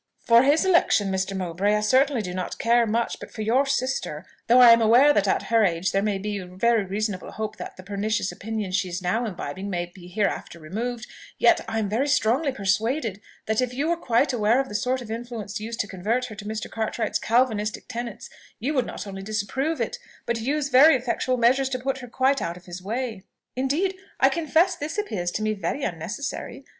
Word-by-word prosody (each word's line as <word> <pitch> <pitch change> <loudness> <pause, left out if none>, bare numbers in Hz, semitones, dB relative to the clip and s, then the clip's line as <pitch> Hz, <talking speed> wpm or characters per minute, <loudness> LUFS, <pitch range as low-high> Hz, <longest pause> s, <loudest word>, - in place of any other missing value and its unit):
"For 235 0 +5
his 290 +7 +3
election, 335 - +3
Mr. 190 +1 -1
Mowbray, 190 +3 0
I 210 - +1
certainly 260 +2 +3
do 180 -2 -5
not 180 -1 -4
care 235 0 +3
much; 230 +2 -1
but - - -9
for 220 - -6
your 255 +6 +2
sister 255 - -2 0.2
though 245 +2 +6
I 245 -2 +10
am 230 0 +6
aware 245 +7 +6
that 205 -5 +2
at - - +1
her 225 -1 +5
age 175 -1 +1
there 195 - +1
may 205 -1 0
be 205 +1 -3
very 200 +5 +1
reasonable 200 0 -3
hope 215 -1 -5
that - - -8
the 185 - -10
pernicious 205 +1 -1
opinions 210 -3 -4
she 190 -2 0
is 180 +1 -5
now 220 +7 0
imbibing 190 0 -5
may 175 -2 -2
be 175 0 -14
hereafter 200 -2 -2
removed, 230 +9 -4 0.3
yet - - +4
I 225 0 -2
am 215 -2 0
very 230 +8 0
strongly 275 +1 +2
persuaded 215 +1 -1 0.2
that 220 +2 +1
if 250 -1 -2
you 290 +5 0
were 340 - +2
quite 260 -3 +1
aware 225 +1 +3
of 270 - -1
the - - -8
sort 250 +5 -1
of 220 - -9
influence 225 -3 -5
used 225 +2 -6
to 205 - -5
convert 215 +7 -1
her 220 -4 -8
to 205 +1 -9
Mr. 215 +1 -4
Cartwright's 225 0 -2
Calvinistic 220 -3 0
tenets, 235 -2 -6 0.3
you 270 +7 -2
would 255 -4 +1
not - - -6
only 195 -1 -7
disapprove 215 +10 -2
it, 485 - -2 0.3
but 235 -1 -1
use 285 +4 -1
very 280 +3 +7
effectual 255 0 -1
measures 260 +3 +3
to 260 - -2
put 265 +1 -2
her 250 - -9
quite 265 +3 +1
out 170 +1 -3
of 180 - -16
his 180 0 -8
way." 225 +1 -3 0.3
"Indeed! 295 +9 0 0.2
I - - +6
confess 335 +2 +2
this 315 +3 -5
appears 210 - -2
to 215 - -3
me 215 0 +1
very 215 +7 -3
unnecessary. 235 - -5
225 Hz, 215 wpm, -25 LUFS, 200-255 Hz, 0.3 s, I